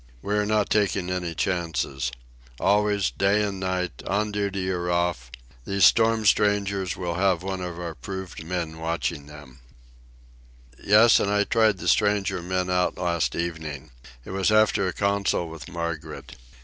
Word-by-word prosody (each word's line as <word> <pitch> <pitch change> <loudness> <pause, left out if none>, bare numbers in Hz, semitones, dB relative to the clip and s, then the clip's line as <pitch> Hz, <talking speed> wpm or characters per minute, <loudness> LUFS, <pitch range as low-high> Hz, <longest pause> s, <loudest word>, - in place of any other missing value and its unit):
We 100 - -2
are 105 0 +1
not 105 -1 +1
taking 100 -3 +1
any 90 -2 -3
chances. 80 -8 -2 0.5
Always, 105 -7 +2
night 100 0 +3 0.2
and 95 -1 -8
day, 90 -1 -1 0.2
on 105 +2 0
duty 100 -2 -2
or 90 -1 -2
off, 85 -8 -1 0.3
these 100 +7 +3
storm 115 -1 +4
strangers 100 -3 +1
will 90 -2 -3
have 90 -1 +1
one 95 -1 -4
of 90 -1 -5
our 85 -2 -5
proved 95 -2 -7
men 80 -2 -4
watching 80 -2 -3
them. 75 -4 -13 1.2
Yes; 110 +3 +6
and 100 - 0
I 105 0 +2
tried 110 -2 +2
the - - -6
stranger 105 -4 +2
men 90 +1 -2
out 90 0 0
last 85 -4 -1
evening. 80 -4 -5 0.3
It - - -8
was 95 +2 +1
after 110 -2 +3
a - - -1
council 100 -3 0
with 80 -1 -9
Margaret. 85 -2 -6
95 Hz, 155 wpm, -25 LUFS, 85-100 Hz, 1.2 s, Yes